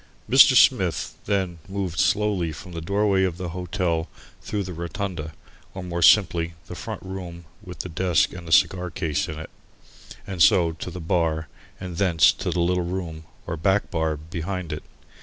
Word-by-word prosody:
Mr. - - +7
Smith, - - +3
then, 95 -4 -1
moved 95 -4 -3
slowly 100 -5 +1
from 90 +4 -10
the 85 -1 -6
doorway 100 +2 +2
of 90 -3 -1
the 90 -2 -4
hotel 90 -1 -2 0.3
through 105 -1 -3
the 90 -1 -6
"rotunda," 85 -1 -4 0.4
or 95 - -5
more 85 -1 -3
simply 85 -1 +4
the - - -8
front 110 +3 -6
room 90 -3 -7 0.2
with 90 -1 -10
the - - -7
desk 90 0 +1
and 85 -2 -9
the - - -7
cigar 90 +2 +3
case 80 -2 -2
in 75 - -6
it, 80 - -8 0.7
and 95 -4 -4
so 90 -5 +5
to 80 - -7
the 90 - -7
bar 80 -2 0 0.3
and 90 -2 -6
thence 90 -4 +5
to - - -4
the 85 - 0
little 90 +1 +1
room 85 -3 -5 0.2
or - - -3
back 95 +5 +1
bar 80 -1 0
behind 85 +2 -5
it. 75 - -5
90 Hz, 175 wpm, -24 LUFS, 80-95 Hz, 0.7 s, Mr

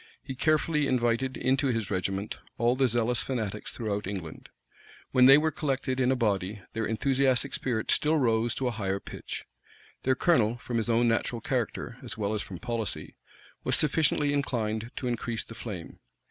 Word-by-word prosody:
He 135 - -5
carefully 150 +1 +2
invited 125 +1 +1
into 135 +2 +2
his 115 -6 -1
regiment 95 +2 -2 0.2
all 120 +2 +3
the 130 0 +3
zealous 120 0 +1
fanatics 110 -5 -3
throughout 105 -4 -3
England. 95 -5 -6 0.6
When 125 0 +6
they 135 +1 +10
were 155 +1 +2
collected 135 -3 -1
in 130 0 +3
a - - +3
body, 100 -4 -1
their 115 -1 -1
enthusiastic 135 +3 +2
spirit 115 -4 -1
still 155 +1 +3
rose 115 -3 +2
to 135 - -2
a - - +1
higher 100 -3 -2
pitch. - - -7 0.6
Their 130 0 +2
colonel, 120 -8 +3
from 120 -1 -3
his 115 +1 -1
own 120 +1 +3
natural 115 +1 0
character, 120 0 -3
as 120 -3 -6
well 105 -1 -1
as 105 - -1
from 95 - -7
policy, 115 +3 -4 0.5
was - - +2
sufficiently 150 -1 +3
inclined 115 -5 -1
to 125 - -3
increase 120 -1 -2
the - - -11
flame. 100 -7 -7
120 Hz, 175 wpm, -28 LUFS, 110-130 Hz, 0.6 s, they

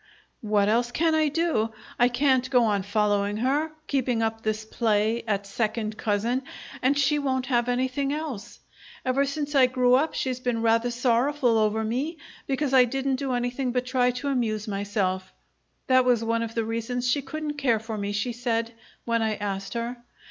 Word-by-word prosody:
"What 210 -3 +2
else 240 +3 +2
can 325 +4 +2
I 310 -1 +3
do? 290 -8 0 0.3
I 245 - +6
can't 260 0 +2
go 250 -3 +4
on 205 -3 +1
following 205 0 0
her, 285 +7 0
keeping 255 -6 0
up 225 0 -2
this 215 0 -2
play 220 0 +1
at 200 -2 -1
second 215 +1 -2
cousin, 225 +5 0 0.4
and 270 +3 +2
she 285 +1 +2
won't 260 -2 -1
have 245 -2 +1
anything 260 +3 0
else. 295 -8 -5 0.5
Ever 265 +2 +2
since 290 +1 -3
I 265 -3 +6
grew 250 -1 +2
up 290 +5 +2
she's 255 -2 -2
been 245 -2 -1
rather 230 +1 +3
sorrowful 245 +1 +2
over 220 0 +2
me 265 +9 -2 0.3
because 275 0 -1
I 260 -1 +8
didn't 270 +2 -1
do 265 -1 -2
anything 245 +1 -1
but 250 0 0
try 250 -1 +2
to 250 +3 -3
amuse 225 -5 -1
myself 195 -2 -2 0.5
that 255 -1 +4
was 245 -2 +2
one 230 0 0
of 230 0 -4
the 230 -1 0
reasons 230 +2 -2
she 280 +3 +2
couldn't 300 +1 -5
care 245 -5 +3
for 220 0 -6
me, 200 -1 -3
she 205 +4 -2
said, 230 -1 -2 0.3
when 230 -1 +1
I 220 -1 0
asked 195 -1 -4
her. 235 +1 -3
245 Hz, 185 wpm, -26 LUFS, 220-265 Hz, 0.5 s, I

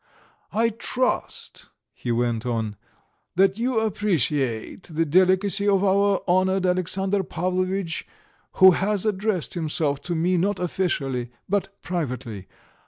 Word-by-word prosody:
"I 230 +2 +2
trust," 250 +3 -2 0.2
he 120 - -4
went 120 -1 0
on, 115 -4 -2 0.6
"that 195 +3 +3
you 245 -1 +1
appreciate 155 - 0
the 165 0 0
delicacy 185 +5 +3
of 195 -1 +3
our 200 0 +2
honoured 185 +1 +2
Alexandr 190 +2 +1
Pavlovitch, 185 0 -2 0.5
who 190 0 +8
has 200 +3 0
addressed 205 -4 -1
himself 155 -4 -1
to 175 +3 -3
me 175 +3 +1
not 195 +3 0
officially, 140 -9 -1 0.2
but 195 0 -2
privately. 125 - -4
185 Hz, 115 wpm, -24 LUFS, 150-195 Hz, 0.6 s, who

